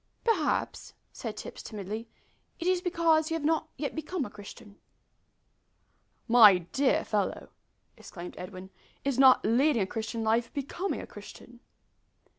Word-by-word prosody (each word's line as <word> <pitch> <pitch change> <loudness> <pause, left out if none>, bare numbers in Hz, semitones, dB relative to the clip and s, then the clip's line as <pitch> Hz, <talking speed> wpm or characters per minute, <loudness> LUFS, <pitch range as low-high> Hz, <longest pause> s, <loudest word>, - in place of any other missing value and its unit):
"Perhaps," 390 -10 -1 0.2
said - - -6
Tipps, - - -8
timidly, 215 +2 -6 0.5
"it 335 - -5
is 365 -1 +2
because 335 -3 +2
you 325 - -1
have 315 -3 -3
not 320 0 +1
yet 285 - -3
become 315 -1 -3
a 205 - -9
Christian." 205 +1 -12 1.5
"My 220 -5 +8
dear 255 +11 0
fellow!" 205 -2 -2 0.5
exclaimed 175 -2 -9
Edwin, 185 +1 -9 0.3
"is 275 -2 0
not 265 -1 +6
leading 235 +1 +3
a - - -1
Christian 225 +3 -4
life 230 +2 +1
becoming 290 +7 -3
a - - -8
Christian?" 245 -1 -13
245 Hz, 135 wpm, -29 LUFS, 210-315 Hz, 1.5 s, My